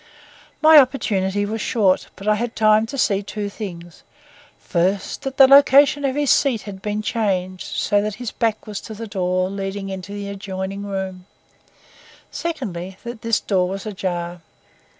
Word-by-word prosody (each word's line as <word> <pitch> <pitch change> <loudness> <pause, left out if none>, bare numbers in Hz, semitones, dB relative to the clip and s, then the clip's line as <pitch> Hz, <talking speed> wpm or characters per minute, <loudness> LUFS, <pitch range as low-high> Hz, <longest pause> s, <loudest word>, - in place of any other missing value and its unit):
My 315 -1 +9
opportunity 205 -7 +1
was 220 +2 -3
short, 200 -6 +1
but 195 - -9
I 215 - +5
had 230 +2 -3
time 215 0 +4
to 275 - -6
see 200 -6 +2
two 205 0 -5
things: 175 -5 -8 0.6
first, 185 +2 -1
that 270 0 -5
the 270 - +9
location 280 +1 +6
of 265 -1 0
his 290 -2 +2
seat 255 -7 +2
had 195 -2 -9
been 210 +1 -3
changed 185 -5 -2
so 205 -1 +1
that 210 0 -3
his 240 0 -5
back 225 -2 -1
was 210 -2 -6
to 220 - -9
the 225 +2 -6
door 185 -3 -1
leading 195 0 -4
into 190 0 -7
the 205 -1 -5
adjoining 195 0 -5
room; 190 -2 -5 1.0
secondly, 190 - -5
that 235 -1 -7
this 230 -1 +1
door 185 -3 0
was 195 +2 -5
ajar. 175 -4 -4
205 Hz, 165 wpm, -21 LUFS, 190-230 Hz, 1.0 s, My